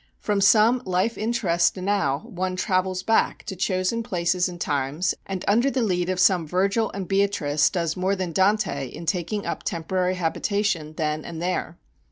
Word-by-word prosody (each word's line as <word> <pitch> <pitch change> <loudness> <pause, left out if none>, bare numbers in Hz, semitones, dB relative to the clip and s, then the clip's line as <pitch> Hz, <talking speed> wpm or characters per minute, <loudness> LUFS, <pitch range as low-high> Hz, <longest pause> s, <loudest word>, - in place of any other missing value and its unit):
From 205 -2 -1
some 220 +4 +5
life 185 +3 0
interest 205 -7 +1
now 180 -8 0
one 185 -4 -3
travels 185 -1 0
back 225 +2 +1
to 190 - -6
chosen 185 +4 0
places 180 -4 0
and 175 -1 -9
times, 145 +4 -1
and 190 -2 -4
under 235 +7 +3
the 260 -3 0
lead 180 -4 0
of 185 -1 -1
some 180 -3 +4
Virgil 195 +6 +1
and 195 -2 -4
Beatrice 195 -7 +2
does 170 -4 -2
more 190 +2 0
than 185 -3 -3
Dante 190 -6 +1
in 165 +6 -9
taking 180 +5 -2
up - - -3
temporary 180 +2 -1
habitation 180 -1 -1
then 155 -1 -2
and 165 -1 -7
there. 175 -1 -2
185 Hz, 170 wpm, -24 LUFS, 170-200 Hz, -, some